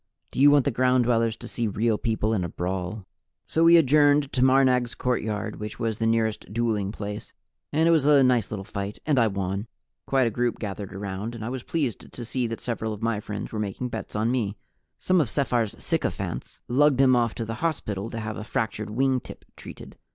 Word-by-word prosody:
"Do - - -5
you 145 +2 +8
want 145 -2 +5
the 140 - +2
Ground 125 +1 +3
Dwellers 115 -1 +2
to - - -10
see 120 -2 -2
Real 110 +2 0
People 110 -1 0
in 95 -5 0
a 85 - -3
brawl?" 90 +4 -4 0.4
So 165 - +1
we 170 +1 +8
adjourned 145 -1 +4
to 125 - +2
Marnag's 130 -2 +3
courtyard, 110 -4 -2
which 105 0 -6
was 115 -2 -2
the 115 - +1
nearest 110 -2 0
dueling 110 -3 0
place, 105 -1 -6 0.4
and 160 +2 +3
it - - +5
was 160 -4 +4
a 145 -2 +6
nice 125 -3 +2
little 100 -2 -5
fight, 100 +1 -5
and 145 -4 +3
I 115 - +4
won. 100 +1 -3 0.4
Quite 135 -2 +3
a 115 - 0
group 120 +2 -1
gathered 100 -2 -6
around, 100 +3 -5
and 110 -2 -6
I - - -3
was 130 0 -4
pleased 140 -5 -3
to 120 - -6
see 125 +1 -1
that 115 0 -5
several 110 -2 -3
of 105 +1 -8
my 115 -2 0
friends 105 -1 -6
were 110 - -4
making 105 +4 -3
bets 110 -3 -6
on 110 +3 +1
me. 110 -5 -1 0.4
Some 185 -2 +2
of 135 - -1
Sephar's 120 -6 0
sycophants - - -3
lugged 140 +2 +3
him 130 -2 +6
off 115 -2 +1
to 115 - -3
the 115 - -4
hospital 115 -11 -2
to 115 - -5
have 110 0 -4
a 110 - -5
fractured 110 -1 -2
wing 130 +4 +1
tip - - -12
treated. - - -11
115 Hz, 215 wpm, -25 LUFS, 105-130 Hz, 0.4 s, you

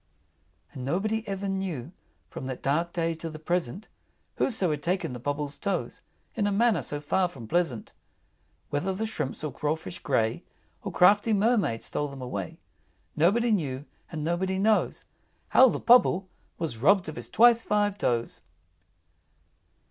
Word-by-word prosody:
V. - - -44 0.7
And - - -5
nobody 215 +9 -1
ever 195 0 -3
knew, 185 -8 -3 0.4
From 130 - -7
that 130 -1 -6
dark 165 +5 +1
day 165 -1 0
to 165 0 -6
the 155 - -8
present, 175 - -2 0.5
Whoso 195 -9 +1
had 150 -1 -2
taken 175 -3 -1
the 125 - -6
Pobble's 145 +2 -3
toes, 200 - -3 0.3
In 210 -4 0
a - - +1
manner 225 +2 +3
so 145 - -5
far 180 +5 +1
from 125 -10 -10
pleasant. 160 -6 -1 0.8
Whether 180 +7 -1
the 220 +3 -2
shrimps 155 -10 -4
or 150 -4 -3
crawfish 155 +5 -3
gray, 115 -5 0 0.4
Or - - -5
crafty 205 +4 +5
Mermaids 205 - +1
stole 145 - -2
them 140 -1 -9
away, 100 -8 -5 0.6
Nobody 220 +9 +3
knew; 145 -9 -1 0.3
and 155 -3 -4
nobody 185 +4 0
knows 215 +2 +1 0.4
How 260 0 +7
the - - -2
Pobble 225 -6 +5 0.3
was 160 -9 -3
robbed 190 - +4
of 155 - -6
his - - -7
twice 235 0 +5
five 205 -1 +1
toes! 120 - -1
170 Hz, 155 wpm, -27 LUFS, 145-205 Hz, 0.8 s, How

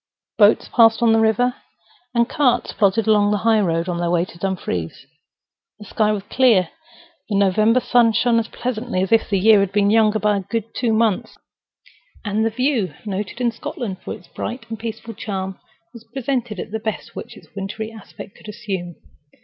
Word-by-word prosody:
Boats 210 0 +5
passed 225 0 +5
on 225 -1 +5
the 225 - +4
river, 225 +3 +2 0.6
and 235 0 +3
carts 265 -3 +1
plodded 200 +1 +2
along 210 -2 +4
the 210 - +1
high 225 -1 +4
road 165 -3 0
on 175 -1 -2
their 175 0 0
way 175 0 +2
to 170 - -15
Dumfries. 135 - -3 0.7
The 210 - -12
sky 215 +1 +1
was 205 -2 -2
clear; 220 -5 +3 0.6
the 205 - -1
November 215 +5 +3
sun 240 -2 +3
shone 235 +1 +3
as 225 - -3
pleasantly 235 -5 -3
as 190 - -4
if 225 - +3
the 200 - +2
year 210 +2 +6
had 195 -1 0
been 200 0 +2
younger 220 -1 +4
by 210 -1 +1
two 230 -1 0
good 240 -3 0
months; 220 -3 0 0.9
and 210 +1 0
the 225 - +2
view, 245 -3 -1
noted 205 +3 -4
in 240 -1 +1
Scotland 225 -3 -5
for - - -5
its 170 - -16
bright 235 0 -6
and 225 -2 -6
peaceful 230 0 -6
charm, 190 -3 -5 0.3
was 235 -2 -12
presented 240 -3 -3
at - - -6
the 220 - -3
best 220 -1 -5
which - - -8
its - - -17
wintry 210 +3 -5
aspect 215 -2 -12
could - - -15
assume. 185 -5 -5
215 Hz, 190 wpm, -21 LUFS, 195-230 Hz, 0.9 s, year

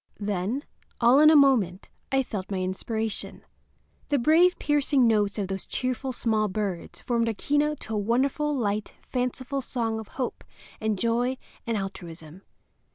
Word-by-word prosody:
Then, 205 +6 -2 0.4
all 245 +3 +6
in 305 +1 +8
a 315 - +6
moment, 235 - +3 0.2
I 270 0 +3
felt 200 -6 -5
my 195 - -2
inspiration. 215 +4 -3 0.7
The 290 - +3
brave, 325 +8 +4
piercing 290 -3 +2
notes 210 -3 +2
of 200 -2 -1
those 195 0 -5
cheerful 255 +1 -2
small 220 -3 +1
birds 195 -3 -4
formed 235 -1 0
a 225 - -1
keynote 295 +5 0
to 220 - -6
a - - 0
wonderful, 270 +7 +1
light, 210 -3 -2
fanciful 255 +2 -2
song 230 -3 -2
of 220 - -8
hope 255 -3 -3 0.4
and 215 -1 0
joy 240 +4 0 0.3
and 230 -2 0
altruism. 175 -4 -7
230 Hz, 155 wpm, -26 LUFS, 205-270 Hz, 0.7 s, in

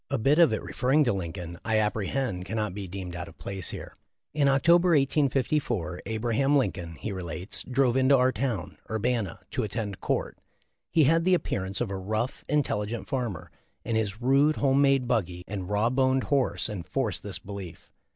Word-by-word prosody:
A 140 - 0
bit 140 +7 +3
of 165 -7 +7
it, 110 - -2
referring 135 +5 +2
to 120 - +2
Lincoln, 85 -2 -5
I 110 -1 +1
apprehend, 105 -1 -1
cannot 105 -2 -2
be 100 -1 -5
deemed 90 -1 -6
out 90 -1 -5
of - - -14
place 95 -3 -2
here. - - -7 0.4
"In 145 -2 +3
October, 170 +5 +5
1854, 135 - 0
Abraham 120 +6 +1
Lincoln," 85 -10 -2
he 100 +9 -5
relates, 90 0 -4
"drove 130 -1 +1
into 130 +1 +5
our 130 0 +3
town 120 -10 -3
(Urbana) 110 -4 -1
to 130 - -1
attend 105 -2 -3
court. - - -2 0.5
He 160 - +4
had 165 +4 +4
the 185 +1 +4
appearance 95 - -3
of 115 -5 -1
a 95 - -2
rough, 110 +7 -3
intelligent 120 -6 -1
farmer, 120 - -3 0.3
and 115 - -1
his 110 -1 -1
rude, 140 +5 +3
home 135 0 +3
made 135 -3 +3
buggy 90 -7 -1
and 95 -2 -5
raw 105 +3 +2
boned 130 0 +2
horse 140 -3 +1
enforced 105 +2 -3
this 100 -3 -5
belief. 95 -2 -9
115 Hz, 175 wpm, -27 LUFS, 100-135 Hz, 0.5 s, of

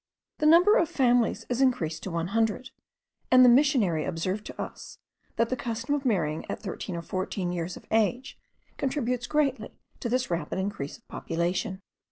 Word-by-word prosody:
The 305 - +3
number 355 +8 +7
of 335 - +2
families 245 -3 +2
is 245 +1 -1
increased 170 -12 +1
to - - -5
one 170 0 -2
hundred, 225 +3 0 0.6
and 255 0 +7
the - - +8
missionary 240 - +3
observed 185 +7 -2
to - - -10
us, - - -7 0.4
that 230 0 +1
the 255 - 0
custom 235 +2 -3
of 285 -1 -2
marrying 160 -10 0
at - - -3
thirteen 190 -2 -5
or 170 - -5
fourteen 185 0 -3
years 175 0 -4
of - - -14
age 240 +5 +1 0.4
contributes 250 -3 -1
greatly 290 -3 -1 0.2
to 240 - -3
this 250 -3 0
rapid 170 +1 -2
increase 190 -7 -4
of 230 - -33
population. 180 +3 -2
225 Hz, 175 wpm, -27 LUFS, 180-255 Hz, 0.6 s, the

